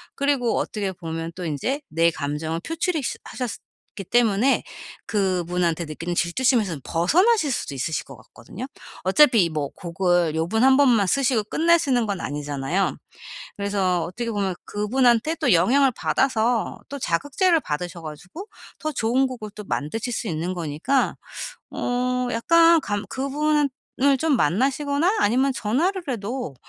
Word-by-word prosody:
그리고 275 -4 +1
어떻게 200 -3 -2
보면 165 -1 -5
또 185 - -6
인제 235 - -2
내 165 +1 +3
감정을 155 +3 -3
표출이스 325 - -2
하셨기 250 -4 -5 0.5
때문에 240 +2 +3 0.4
그분한테 180 -4 0
느끼는 165 +3 -5
질투심에선 195 - +1
벗어나실 320 - +3
수도 145 - -3
있으실 150 +3 -2
것 135 - -11
같거든요. 125 - -10 0.4
어차피 200 - +5
뭐 150 -2 -2
곡을 175 -2 0
요번 180 +9 0
1 265 0 +6
번만 240 -8 +4
쓰시고 255 0 +2
끝내시는 300 -4 +2
건 200 -3 -3
아니잖아요. 145 +5 -2 0.6
그래서 195 -4 0
어떻게 230 +7 -4
보면 200 -4 -1
그분한테 240 +6 +2
또 270 -8 +3
영향을 265 +11 +4
받아서 235 -2 0
또 280 - -6
자극제를 290 - +1
받으셔 170 - -4
가지고 175 - -9 0.3
더 310 0 -3
좋은 255 +1 +1
곡을 240 -5 -7
또 210 - -7
만드실 210 +9 -3
수 230 - -3
있는 170 +2 -2
거니까 170 - 0 0.6
어 250 0 -1
약간 335 +7 +5
감 205 -4 -3
그분은 295 +2 0 0.3
을 275 0 +4
좀 300 0 +2
만나시거나 280 - +1
아니면 260 - +2
전화를 300 - 0
해도 235 - -4
220 Hz, 315 characters per minute, -23 LUFS, 175-270 Hz, 0.6 s, 1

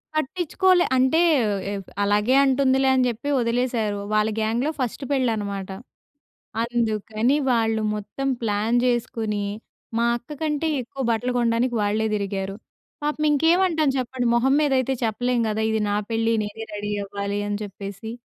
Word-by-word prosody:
పట్టించుకోలే. 355 +4 +2
అంటే 260 +5 +3 0.5
ఏవ్ 195 -2 -5 0.2
అలాగే 210 +5 +2
అంటుందిలే 265 0 +3
అని 255 -1 +3
జెప్పి 240 +5 -3
వదిలేసారు. 235 -3 0
వాళ్ళ 215 +1 +3
గ్యాంగ్‌లో 235 +7 0
ఫస్ట్ 255 +2 -2
పెళ్ళి 260 -4 +2
అనమాట. 200 -2 -4 0.9
అందుకని 230 +1 0 0.2
వాళ్ళు 225 -1 +1
మొత్తం 240 +6 -4
ప్లాన్ 215 +2 +1
జేసుకొని. 225 -4 -1 0.6
మా 235 - +2
అక్క 240 +5 -10
కంటే 305 0 0
ఎక్కువ 265 +2 -6
బట్టలు 245 +2 0
కొనడానికి 235 +1 +1
వాళ్ళే 215 +2 +1
తిరిగారు. 195 -1 -3 0.5
పాపం 300 +1 -1
ఇంకేమంటాం 325 +1 +3
చెప్పండి. 250 -1 -2
మొహం 265 +3 +3
మీద 295 -2 +2
అయితే 260 +1 0
చెప్పలేం 245 +2 0
గదా! 220 +1 -1
ఇది 220 - 0
నా 205 - +1
పెళ్ళి 225 0 +1
నేనే 210 +2 -6
రెడీ 205 0 -4
అవ్వాలి 200 0 -3
అని 205 0 -2
చెప్పేసి. 200 +1 -7
235 Hz, 140 wpm, -23 LUFS, 210-265 Hz, 0.9 s, అంటే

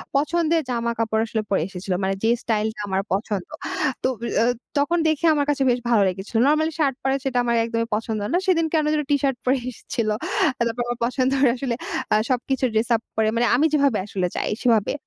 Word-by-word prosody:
পছন্দের 325 +3 +2
জামাকাপড় 230 -2 0
আসলে 220 -1 -1
পরে 195 - +2
এসেছিল। 190 0 -4
মানে 195 - +1
যে 225 - +3
স্টাইলটা 220 0 -1
আমার 190 0 0
পছন্দ। 200 -2 -2 0.6
তো - - +3
বি 235 - -3 0.2
আ - - +3 0.3
তখন 290 +5 +2
দেখে 315 +1 +1
আমার 290 -1 +1
কাছে 280 -2 +1
বেশ 245 0 +2
ভালো 225 -3 +4
লেগেছিল। 190 +5 -7
নরমালি 315 +2 +2
শার্ট 275 -4 +2
পরে, 270 0 +1
সেটা 260 -2 0
আমার 235 -1 +1
একদমই 230 0 -2
পছন্দ 220 0 -2
না। - - +4
সেদিন 330 -3 +3
কেন 310 -2 +2
যেন 305 - +1
টি - - +6
শার্ট 270 -3 +1
পরে 260 +2 +3
এসেছিল। 230 -2 -3 0.5
তারপর 235 0 -1
আমার 240 0 -2
পছন্দের 265 +2 +1
আসলে 245 -2 -2 0.4
আ - - +5
সবকিছু 260 +1 0
ড্রেস 220 +2 +1
আপ 225 - -2
পরে 220 -1 +2
মানে 235 - +2
আমি 285 +6 +3
যেভাবে 280 -6 +3
আসলে 190 -3 -2
চাই - - -1
সেভাবে। 225 -5 +2
240 Hz, 200 wpm, -23 LUFS, 220-280 Hz, 0.6 s, টি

